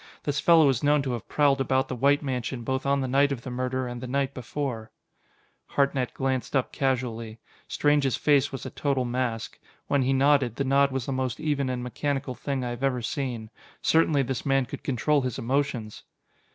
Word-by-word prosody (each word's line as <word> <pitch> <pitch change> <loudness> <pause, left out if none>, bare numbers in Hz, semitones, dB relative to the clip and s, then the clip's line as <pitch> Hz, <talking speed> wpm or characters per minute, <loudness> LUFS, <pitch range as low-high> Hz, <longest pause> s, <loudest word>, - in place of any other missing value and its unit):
This 145 0 -1
fellow 165 -3 +6
is 130 -3 0
known 145 -1 +3
to 135 - -2
have 120 -3 -5
prowled 140 -2 +3
about 130 0 +1
the 130 - -4
White 140 +4 +3
mansion 125 -2 -3
both 130 +3 -2
on 140 0 +2
the 130 - -1
night 140 +2 +3
of 125 -4 -4
the 130 - -6
murder 130 +1 -2
and 120 -1 -6
the 130 - -5
night 135 +1 -1
before." 125 -2 -4 0.8
Hartnett 140 -3 0
glanced 130 0 -1
up 130 - +1
casually. 120 -4 -2 0.3
Strange's 145 -3 +2
face 145 -2 +3
was 135 -2 -6
a - - -5
total 135 -3 0
mask. 120 -2 -3 0.3
When 140 -1 +1
he 130 +1 +1
nodded, 135 -3 +3
the 140 - -1
nod 140 +1 +3
was 130 -3 -2
the - - -3
most 130 -1 -2
even 145 -4 0
and 125 -1 -3
mechanical 135 +1 -2
thing 130 +1 -3
I 120 - -3
have 120 +1 -6
ever 125 -3 0
seen. 115 -3 -3 0.3
Certainly 160 -3 +3
this 130 -2 -3
man 135 -1 +2
could - - -8
control 140 +3 +1
his 125 -3 -3
emotions! 125 -4 -2
130 Hz, 200 wpm, -26 LUFS, 125-140 Hz, 0.8 s, fellow